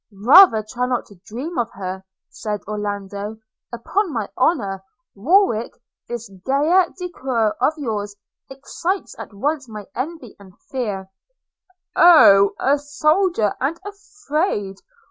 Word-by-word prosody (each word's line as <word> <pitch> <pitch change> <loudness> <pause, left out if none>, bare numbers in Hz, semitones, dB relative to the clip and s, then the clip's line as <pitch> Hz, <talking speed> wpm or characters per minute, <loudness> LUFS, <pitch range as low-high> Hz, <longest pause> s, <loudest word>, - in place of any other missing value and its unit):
'Rather 255 - +7
try 250 +3 -2
not 250 -1 -1
to 195 -4 -19
dream 265 +8 -5
of 235 -1 -1
her,' 190 0 -6 0.2
said 210 -1 -5
Orlando; 205 0 -5 0.3
'upon 345 - -2
my 225 -6 -3
honour, 200 - 0 0.3
Warwick, 245 - +2 0.3
this 235 -1 -6
gaieté 280 - +1
de 360 -1 -5
coeur 235 -8 -1
of 275 +5 +3
yours 210 -7 -4 0.3
excites 330 +8 -4
at - - -8
once 275 +5 -3
my 210 -2 -8
envy 275 -3 -6
and 190 -2 -16
my - - -31
fear.' 205 -8 -4 0.8
'Oh! 200 - +7
a 280 +2 +2
soldier, 300 - +1
and 300 +6 -1
afraid! 380 - -3
245 Hz, 125 wpm, -20 LUFS, 205-315 Hz, 0.8 s, Rather